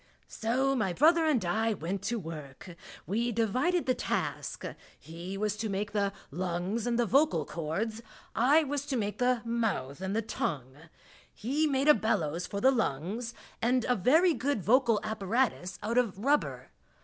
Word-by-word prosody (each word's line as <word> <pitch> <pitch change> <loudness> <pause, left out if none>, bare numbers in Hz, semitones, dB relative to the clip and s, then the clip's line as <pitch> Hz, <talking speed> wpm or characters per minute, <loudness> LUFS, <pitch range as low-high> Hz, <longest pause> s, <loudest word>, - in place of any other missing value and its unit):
So 260 +5 0
my 205 -7 0
brother 320 - +4
and 250 -11 +2
I 220 +5 +1
went 185 +3 -4
to 235 +3 0
work. 160 -2 -8 0.3
We 230 +5 0
divided 255 - +1
the 255 - +3
task - - -3 0.3
he 170 +5 -7
was 210 0 -1
to 220 0 -3
make 205 +1 -2
the 200 -2 0 0.2
lungs 180 - -2
and 235 -1 +1
the 240 - +2
vocal 230 - +3
cords, 195 +10 -3 0.3
I 285 +7 +4
was 285 0 -3
to 270 - -1
make 205 -2 -2
the 250 -1 +2
mouth 210 - -1
and 190 +2 -2
the 225 - 0
tongue. 130 - -3 0.6
He 285 +8 0
made 275 0 +1
a 300 - +9
bellows 175 - -1
for 200 - -4
the 260 +5 +5
lungs 225 - -2 0.3
and 245 +1 +2
a 250 - +2
very 315 - +4
good 250 - -1
vocal 235 0 +4
apparatus 215 -2 -1
out 230 +4 +2
of 225 -6 -1
rubber. 280 +8 0
225 Hz, 165 wpm, -30 LUFS, 190-255 Hz, 0.6 s, a